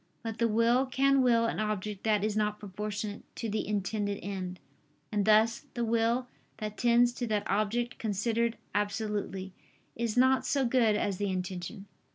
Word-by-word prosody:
But 225 -1 -5
the 230 - +3
will 230 +4 +3
can 275 +1 +3
will 235 -2 +4
an 230 - -1
object 210 -2 -2
that 210 -2 +2
is 215 -1 0
not 210 -1 0
proportionate 210 +1 -5
to 230 - -3
the 215 0 -2
intended 205 0 -1
end: 185 -2 -4 0.5
and 205 -2 +1
thus 220 +2 +4
the 240 -1 0
will 230 +2 +1 0.3
that 215 -1 -5
tends 240 +1 +4
to 245 -1 -3
that 210 -2 0
object 230 +4 0
considered 230 +2 0 0.2
absolutely, 205 -2 -2 0.4
is 235 0 -2
not 260 +1 +5
so 275 -2 +1
good 235 -3 +3
as 200 -2 -1
the 205 0 -1
intention. 185 +1 -4
215 Hz, 165 wpm, -30 LUFS, 205-235 Hz, 0.5 s, not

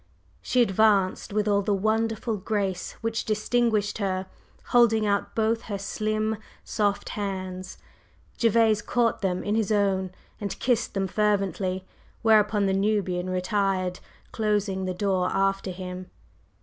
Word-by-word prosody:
She 250 -1 +3
advanced 200 -3 +2
with 210 +1 0
all 200 -1 +3
the 205 0 +1
wonderful 220 +2 0
grace 195 -2 -2
which 225 0 -1
distinguished 215 -1 0
her, 190 -2 -1 0.4
holding 225 -3 +4
out 200 -1 0
both 225 +1 +1
her 205 -2 -3
slim, 215 +2 -1 0.3
soft 205 -2 -1
hands. 185 -2 -5 0.6
Gervase 225 -2 +4
caught 235 -1 0
them 185 -2 -1
in 205 - -1
his 220 -2 +1
own 195 -2 +1 0.3
and 205 -2 -4
kissed 240 -4 0
them 195 -1 +1
fervently, 195 -2 0 0.4
whereupon 210 -2 +4
the 190 - +1
Nubian 195 -3 0
retired, 185 0 0 0.3
closing 205 -3 0
the 185 -1 -2
door 185 -2 +1
after 195 0 0
him. 180 0 -7
205 Hz, 130 wpm, -26 LUFS, 190-220 Hz, 0.6 s, holding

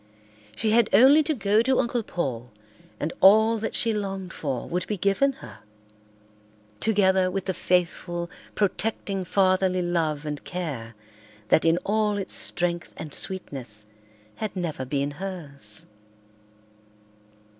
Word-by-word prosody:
She 220 -1 0
had 235 +1 +4
only 265 +9 +7
to 310 0 -1
go 210 -1 +3
to 260 +2 +2
Uncle 240 -1 0
Paul 130 - -4 0.5
and 150 - -2
all 220 +4 +6
that 220 - -3
she 230 -1 +2
longed 195 -3 -4
for 135 -5 -3
would 180 +1 -2
be 210 - -2
given 200 +9 +2
her, 105 -3 -12 1.2
together 190 -4 +3
with 190 0 -3
the 190 - -1
faithful, 175 -1 -1 0.3
protecting 200 -1 -1
fatherly 185 0 +2
love 160 -4 -1
and 150 -1 -4
care 140 -11 -5 0.5
that 160 - +4
in 165 +1 +4
all 210 0 +1
its 195 - -4
strength 175 -1 -1
and 150 - -6
sweetness 125 - -3 0.5
had 215 -2 -4
never 160 -7 -3
been 140 +2 -1
hers. 145 - -6
185 Hz, 130 wpm, -25 LUFS, 155-210 Hz, 1.2 s, only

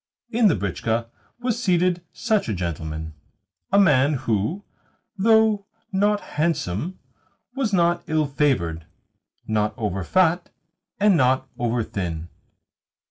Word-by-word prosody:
In 230 -1 +4
the 185 - +3
britchka 110 +4 -2 0.3
was 245 -1 -1
seated 180 -4 +2
such 220 - 0
a 105 - -1
gentleman 80 -2 -4 0.6
a 200 - +4
man 145 -6 +4
who, 130 - -1 0.5
though 220 0 +3 0.2
not 205 +1 +2
handsome, 155 - -2 0.6
was 265 -6 0
not 175 -2 +2
ill 155 -1 +1
favoured, 120 - 0 0.6
not 105 -1 0
over 100 -5 -2
fat, 175 - +2 0.5
and 205 -2 +5
not 130 -2 +2
over 120 -1 0
thin. 85 -5 -4
150 Hz, 115 wpm, -23 LUFS, -, 0.6 s, and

